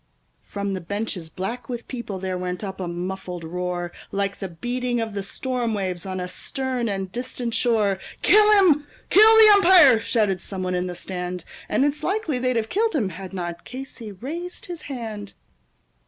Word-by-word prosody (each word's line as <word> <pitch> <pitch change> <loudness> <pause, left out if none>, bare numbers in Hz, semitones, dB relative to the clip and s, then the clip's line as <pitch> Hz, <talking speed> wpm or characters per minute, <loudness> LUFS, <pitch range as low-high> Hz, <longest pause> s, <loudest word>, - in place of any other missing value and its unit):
From 200 -1 -4
the 190 - -3
benches, 195 -2 -4
black 230 +8 -5
with 240 -2 -5
people, 235 -6 -5
there 185 0 -3
went 180 +2 -4
up 190 -1 -5
a 185 - -3
muffled 180 0 -5
roar, 175 +1 -3 0.2
Like 200 0 -1
the 195 - -3
beating 245 +7 -2
of 225 -2 -3
the 200 - -2
storm 240 +2 -2
waves 185 -2 -3
on 185 -1 -3
a 180 - -3
stern 255 +3 -3
and 195 -2 -3
distant 245 0 -4
shore; 220 -5 +2 0.2
"Kill 425 0 +6
him! 320 -8 +5 0.2
Kill 440 +2 +8
the 435 -1 +9
umpire!" 350 - +7
shouted 210 -6 0
some 190 -2 -4
one 185 0 -1
in 180 0 -1
the 180 - -5
stand. 180 -1 -4 0.3
And 270 - +3
it's 290 +1 -1
likely 345 -6 -1
they'd 255 0 +1
have 220 -1 0
killed 435 -1 +1
him 220 -10 +1
had 185 +1 -8
not 175 -3 -5
Casey 255 -4 -8
raised 320 - -6
his 350 -3 -6
hand. 220 -6 -6
215 Hz, 185 wpm, -24 LUFS, 185-260 Hz, 0.3 s, the